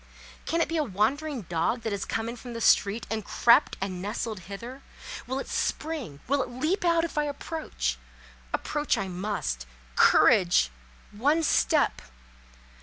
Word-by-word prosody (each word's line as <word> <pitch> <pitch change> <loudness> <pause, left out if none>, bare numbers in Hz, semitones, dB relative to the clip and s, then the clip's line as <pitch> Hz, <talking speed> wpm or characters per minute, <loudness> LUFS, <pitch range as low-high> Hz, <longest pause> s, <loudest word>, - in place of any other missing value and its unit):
Can 335 +1 +1
it - - +2
be 330 - -2
a 310 - +2
wandering 260 +5 -1
dog 170 +8 -1
that 225 - -2
has 200 -1 -2
come 225 0 -2
in 235 - -4
from 245 0 -9
the 230 - -5
street 210 +1 +3
and 220 -1 -1
crept 235 +4 +4
and 185 -2 -4
nestled 210 +1 -3
hither? 240 +7 -7 0.5
Will 260 +2 -2
it 275 - -4
spring, 290 - -3
will 280 +2 +2
it - - -3
leap 310 +11 -1
out 335 -1 +3
if 320 - -3
I 295 - +1
approach? 280 - -3 0.5
Approach 295 0 0
I 195 - -2
must. 175 - -3 0.3
Courage! 175 - +5 0.4
One 290 +10 +2
step! - - +2
235 Hz, 160 wpm, -27 LUFS, 195-295 Hz, 0.5 s, Courage